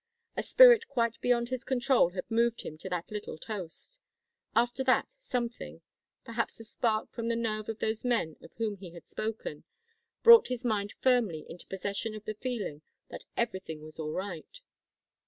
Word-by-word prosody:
A - - 0
spirit 485 -2 +7
quite 235 -4 0
beyond 240 -1 +2
his 255 0 -3
control 260 -6 +3
had 180 +1 -4
moved 235 0 +1
him 155 - -7
to 190 - -6
that 180 0 -3
little 210 -6 -5
toast. 210 - -7 0.6
After 240 +3 +2
that, 260 - +3
something 245 - -4 0.4
perhaps 230 0 -3
a - - -8
spark 220 -1 -1
from 230 -1 -4
the 230 - +1
nerve 215 -2 -2
of 225 - -3
those 220 0 -2
men 230 -11 +1
of - - -13
whom 220 -3 -2
he 180 -3 -11
had 170 - -11
spoken 215 -9 -5 0.6
brought 465 -1 +10
his 250 0 -4
mind 205 -3 0
firmly 225 -12 +2
into 175 - -10
possession 200 +3 -3
of 215 +1 -9
the 215 - -3
feeling 215 - -4 0.3
that - - -9
everything 190 -9 -2
was 155 +1 -12
all 155 -1 -3
right. 190 - -6
225 Hz, 175 wpm, -30 LUFS, 195-245 Hz, 0.6 s, brought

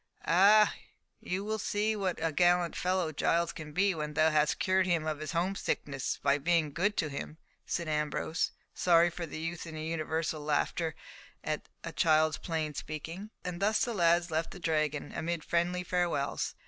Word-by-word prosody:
"Ah! 205 +5 +6 0.5
you 185 +2 -3
will 215 +1 -2
see 210 +1 0
what 190 -4 -1
a 165 - +1
gallant 175 +1 +3
fellow 180 -3 0
Giles 170 +3 +1
can 155 -1 -8
be 195 +4 +2
when 150 -2 -4
thou 160 +1 +4
hast 150 -1 +2
cured 190 -1 +2
him 170 -3 +1
of 155 -1 -2
his 155 +2 -5
home 175 +3 +1
sickness 140 -8 -2
by 140 +1 +3
being 160 -1 +1
good 205 +6 0
to 155 - +1
him," 150 +2 -6 0.3
said 170 -2 -2
Ambrose, 150 +1 -1 0.2
sorry 170 -1 +4
for 170 0 -5
the 150 - -7
youth 165 +1 -4
in 160 - -7
the 155 0 -5
universal 160 -1 -2
laughter 155 +2 0 0.5
at - - -3 0.2
the - - -5
child's 155 -1 +3
plain 160 -3 -2
speaking. 160 +7 -6 0.2
And 180 0 -4
thus 215 +2 +3
the 240 - -3
lads 170 -2 +3
left 160 +1 0
the 190 - -10
Dragon, 155 -3 -1
amid 170 -1 -3
friendly 175 +2 0
farewells. 175 -6 -1
165 Hz, 180 wpm, -31 LUFS, 155-180 Hz, 0.5 s, Ah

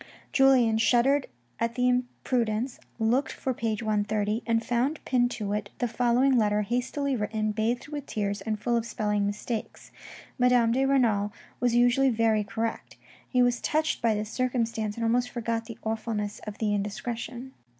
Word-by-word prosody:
Julien 255 -5 +5
shuddered 260 +5 +3 0.3
at 230 0 -1
the 250 0 +2
imprudence, 245 -1 -1 0.2
looked 235 +5 +1
for 260 - -3
page 225 -2 -2
130, 210 0 0
and 230 0 +1
found 255 +6 0
pinned 245 -2 +2
to 205 -4 -3
it 205 -1 -3
the 245 - 0
following 245 +2 +3
letter 210 -1 +2
hastily 255 +5 -1
written, 215 -1 -1
bathed 230 +5 -1
with 290 -2 -6
tears, 205 -1 -2
and 215 +1 -3
full 240 +3 0
of 230 - +1
spelling 210 -3 -1
mistakes. 215 +2 -5 0.5
Madame 250 -2 +4
de 265 +3 +2
Renal 225 -7 +2 0.3
was 245 -1 +2
usually 245 +3 +4
very 225 -2 +2
correct. 225 +2 -4 0.3
He 250 -1 +3
was 245 -1 +1
touched 310 +1 0
by 230 -2 +2
this 210 +1 -4
circumstance, 230 -4 -1
and 230 - -2
somewhat 240 +2 +2
forgot 230 -1 -3
the 230 - -9
awfulness 220 -2 -3
of 210 - -6
the 210 -2 0
indiscretion. 235 +5 -4
230 Hz, 160 wpm, -27 LUFS, 215-250 Hz, 0.5 s, Julien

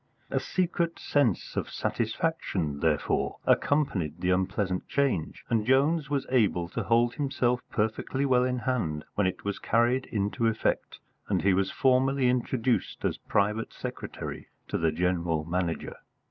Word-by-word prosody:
A - - +2
secret 170 -2 -1
sense 135 -10 0
of - - -2
satisfaction, 110 - -1
therefore, 75 -2 0
accompanied 95 - +1
the 90 +1 +1
unpleasant 95 0 0
change, 130 - -1
and 115 -2 +1
Jones 140 +5 +2
was 140 -2 0
able 100 -9 +2
to - - -3
hold 120 +1 +3
himself 125 -4 0
perfectly 110 +5 -1
well 125 -2 +4
in 125 0 0
hand 110 - -1
when 100 -2 +2
it 95 +1 -4
was 100 -1 -2
carried 120 +3 +2
into 105 +2 0
effect 110 -1 -1 0.3
and - - +1
he 95 0 +4
was 95 +1 +1
formally 130 0 +3
introduced 125 0 0
as - - -1
private 105 +3 0
secretary - - -6 0.2
to - - -1
the 80 -1 +2
General 85 -2 0
Manager. 85 0 -2
115 Hz, 145 wpm, -28 LUFS, 90-130 Hz, 0.3 s, well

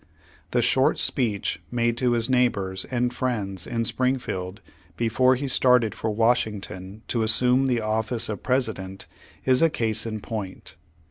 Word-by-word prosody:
The - - +1
short - - +3
speech 110 -6 0
made 120 -1 +1
to 125 -1 +2
his 115 0 +1
neighbors 100 -8 +1
and 125 -1 -1
friends 105 -8 -2
in 115 -1 -1
Springfield 110 -7 -2 0.4
before 125 +3 +3
he 140 +2 -3
started 125 -3 +3
for 110 - -3
Wash 115 +3 +2
ington, 95 -1 -8
to 115 - 0
assume 125 +4 +2
the 120 -3 +1
office 110 +2 -1
of 105 - -5
President, 110 -7 -2 0.4
is 130 -1 +4
a 165 - +5
case 115 -5 -1
in 110 -1 -4
point. 100 -3 -7
115 Hz, 150 wpm, -25 LUFS, 105-125 Hz, 0.4 s, a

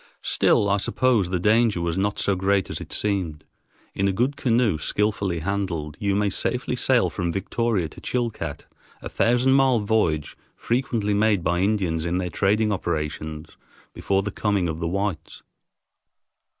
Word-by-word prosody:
Still, 100 - +2
I 100 0 +2
suppose, 110 -2 +1
the 90 -1 -1
danger 110 0 +3
was 85 -1 -1
not 100 +2 -1
so 100 - +1
great 95 +1 +1
as - - -5
it - - -9
seemed. 95 -7 -2 0.5
In 100 - 0
a - - +2
good 125 +9 0
canoe, 120 - +1
skillfully 100 -2 -1
handled, 85 -5 -3
you 100 -1 0
may 105 0 +1
safely - - -1
sail - - +2
from 85 -1 -2
Victoria 100 0 -1
to - - -13
Chilcat, 115 - -3 0.4
a - - -5
thousand 125 +3 +2
mile 135 -3 +4
voyage 100 -8 0 0.2
frequently 115 -4 -1
made 105 -3 +2
by 85 +1 +1
Indians 95 -5 0
in 85 +1 -1
their 90 -1 -2
trading 105 +4 +1
operations 80 -3 -4 0.4
before 95 0 0
the 105 - -3
coming 100 -3 0
of 80 -1 -4
the 85 - -2
whites. 100 0 -3
100 Hz, 160 wpm, -24 LUFS, 85-110 Hz, 0.5 s, mile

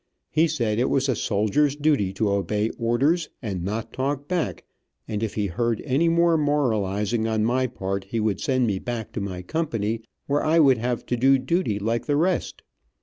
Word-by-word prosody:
He 160 +2 +3
said 115 -8 -1
it 125 - +2
was 135 0 +1
a 130 - +1
soldier's 110 +9 +1
duty 145 -10 +1
to 100 +1 0
obey 105 +3 0
orders 140 +8 +1
and 95 -7 -4
not 110 +4 -4
talk 140 +2 -2
back, 180 -3 -2 0.4
and 105 -2 -3
if 110 -2 -3
he 105 - 0
heard 115 +5 -1
any 150 +5 +2
more 170 0 +3
moralizing 110 -7 0
on 110 -1 +1
my 130 +2 +1
part 100 -4 -4
he 115 +4 -3
would 105 -3 0
send 130 -2 +1
me 100 -4 0
back 115 -1 -5
to 110 - -4
my 95 -2 -5
company, 115 - -2 0.2
where 145 +1 0
I 160 +2 +3
would 135 -7 +5
have 120 +1 -2
to 125 - -1
do 135 +3 +5
duty 130 - 0
like 115 +3 -2
the 145 - +2
rest. 180 +4 0
120 Hz, 195 wpm, -24 LUFS, 105-145 Hz, 0.4 s, would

